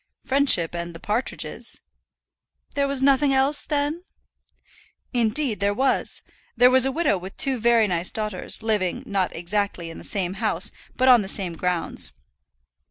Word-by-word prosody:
"Friendship 265 - +3
and 170 0 -5
the - - -9
partridges." 215 +7 -2 0.9
"There 280 0 0
was 275 -1 0
nothing 275 0 +3
else, 275 +2 +3
then?" 295 +3 -2 1.1
"Indeed 240 0 0
there 200 0 0
was. 265 +3 0 0.3
There 250 +2 +6
was 260 0 +6
a - - -1
widow 290 - 0
with 190 +2 -10
two 265 -3 -1
very 230 0 +4
nice 175 -3 +1
daughters, 215 -1 -4
living, 215 +2 -1
not 195 -5 -1
exactly 175 -1 -2
in - - -10
the - - -11
same 185 -3 0
house, 210 -2 0 0.2
but 255 - +1
on 250 -3 +7
the 195 - -5
same 185 -4 +3
grounds." 180 0 -2
220 Hz, 155 wpm, -23 LUFS, 185-265 Hz, 1.1 s, on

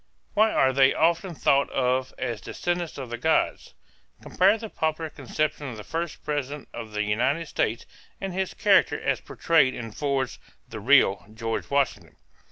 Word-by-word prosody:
Why 220 +1 +4
are 130 0 +3
they 135 0 +4
often 170 +2 +1
thought 140 -1 +2
of 130 0 0
as 120 -4 -3
descendants 175 -1 -3
of 130 -4 -7
the 120 - -4
gods? 160 +5 0 0.5
Compare 195 +4 +3
the 225 0 -7
popular 160 0 -2
conception 150 +2 -2
of 115 - -8
the 105 - -8
first 165 +4 -4
president 145 -1 -3
of 110 -1 -7
the 105 0 0
United 130 +10 0
States 115 -4 -1 0.3
and 195 -1 -4
his 190 0 -2
character 205 -1 +3
as - - -1
portrayed 155 -6 +2
in 115 -2 -6
Ford's 135 0 -2 0.3
"The 110 - -7
Real 105 -5 +4
George 115 0 -3
Washington." 100 - -1
140 Hz, 165 wpm, -26 LUFS, 120-165 Hz, 0.5 s, Why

